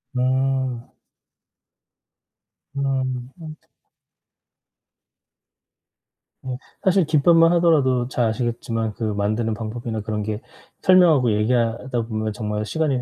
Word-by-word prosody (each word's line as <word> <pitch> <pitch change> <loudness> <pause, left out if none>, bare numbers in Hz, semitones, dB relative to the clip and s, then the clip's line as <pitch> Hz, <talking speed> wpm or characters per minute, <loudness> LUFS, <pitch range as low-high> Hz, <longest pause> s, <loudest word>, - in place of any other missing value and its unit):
음. 130 -1 -1 1.8
음 130 -2 -2
음. 155 -2 -8 2.9
예 130 -1 -4 0.3
사실 190 -2 +3
김밥만 165 +2 +4
하더라도 140 -8 +3
잘 125 -2 0
아시겠지만 115 -1 -2
그 - - -6
만드는 110 +2 -1
방법이나 110 +1 -5
그런 105 0 -3
게 105 +1 -4 0.4
설명하고 170 - +5
얘기하다 115 +3 0
보면 110 -1 -3
정말 105 0 -3
시간이 140 +2 -1
125 Hz, 210 characters per minute, -22 LUFS, 110-140 Hz, 2.9 s, 설명하고